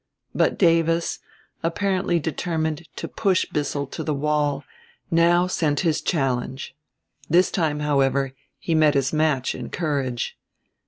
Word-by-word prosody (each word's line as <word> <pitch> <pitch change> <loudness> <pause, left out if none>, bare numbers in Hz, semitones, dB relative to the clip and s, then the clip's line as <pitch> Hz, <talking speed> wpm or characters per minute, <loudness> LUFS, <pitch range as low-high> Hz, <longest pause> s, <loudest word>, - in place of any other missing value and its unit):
But - - +2
Davis, 165 -1 +2 0.4
apparently 185 +1 0
determined 160 0 -2
to - - -5
push 195 -4 +1
Bissell 145 -1 -2
to 135 - -6
the 150 - -1
wall, 145 -1 0 0.5
now 170 +1 +4
sent 155 -5 0
his 165 -4 +1
challenge. 135 -4 -1 0.6
This 175 +4 +4
time, 155 -4 0
however, 140 -2 +1 0.2
he 165 - -2
met 155 -2 +4
his 135 +1 +1
match, 155 -4 +1
in - - -7
courage. 140 -7 -2
155 Hz, 125 wpm, -23 LUFS, 140-170 Hz, 0.6 s, now